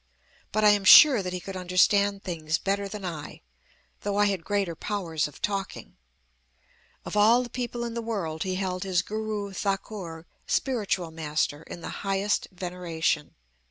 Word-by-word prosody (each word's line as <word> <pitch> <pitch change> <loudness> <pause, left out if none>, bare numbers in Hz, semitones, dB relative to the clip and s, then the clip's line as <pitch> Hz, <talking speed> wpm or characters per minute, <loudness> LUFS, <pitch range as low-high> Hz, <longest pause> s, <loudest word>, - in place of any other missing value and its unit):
But 215 +1 0
I 210 - +8
am 205 -1 +2
sure 255 +4 +9
that 180 -1 -4
he 180 - -3
could 195 +1 -8
understand 195 +2 +2
things 160 -3 -2
better 200 0 -1
than 200 -1 -7
I, 155 -4 -6 0.6
though 205 0 -2
I 205 - +4
had 195 -4 -1
greater 200 -3 -1
powers 165 -6 -2
of 150 - -15
talking. 195 - -3 1.1
"Of - - -5
all 225 +4 +5
the 240 - -9
people 240 -1 -4
in 235 -1 -4
the 235 - -3
world 190 -9 -3
he 185 -1 -1
held 185 -1 -2
his 185 -2 +1
Guru 215 -2 -4
Thakur 190 -4 -4 0.2
(spiritual 205 -10 -1
master) 155 -2 -2
in 170 - -10
the - - -6
highest 195 +1 0
veneration. 175 -4 -2
195 Hz, 160 wpm, -27 LUFS, 175-205 Hz, 1.1 s, sure